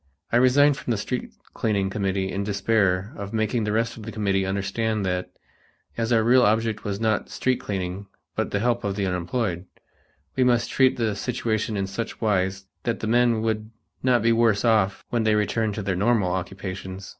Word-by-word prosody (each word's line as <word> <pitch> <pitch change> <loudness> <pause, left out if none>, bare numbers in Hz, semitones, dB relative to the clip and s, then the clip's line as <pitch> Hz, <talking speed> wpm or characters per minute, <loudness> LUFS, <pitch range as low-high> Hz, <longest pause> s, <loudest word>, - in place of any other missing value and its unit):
I 120 - +4
resigned 135 +3 +5
from - - -7
the 115 - +1
street 125 +5 -3 0.2
cleaning 100 -3 0
committee 95 -1 -1
in 100 +2 -2
despair 100 -1 +1
of 100 +1 -6
making 110 +1 0
the 105 - -1
rest 115 +2 0
of - - -9
the 115 - -6
committee 100 -3 0
understand 100 +2 -1
that, 90 0 -2 0.7
as 115 +1 -1
our 115 -2 +4
real 125 +3 +5
object 110 -1 +1
was 100 -1 -3
not 110 -2 0
street 130 -1 0
cleaning 95 0 -4 0.3
but - - -1
the 100 - -1
help 120 0 +1
of 100 -1 -1
the 100 -1 -1
unemployed, 90 0 -2 0.7
we 130 - +3
must 120 -2 +2
treat 130 -1 +3
the 110 -3 0
situation 110 -3 -2
in 95 - 0
such 105 +4 -5
wise 95 -3 0 0.2
that 115 - -2
the - - -2
men 120 0 +3
would 110 -1 -1 0.3
not 125 -3 +3
be 115 - +4
worse 115 -2 +3
off 110 -4 +2
when 120 -2 +1
they 110 -1 +3
returned 105 0 0
to 105 - -4
their 95 -1 -1
normal 105 -1 +2
occupations. 95 +1 -5
110 Hz, 190 wpm, -24 LUFS, 95-115 Hz, 0.7 s, resigned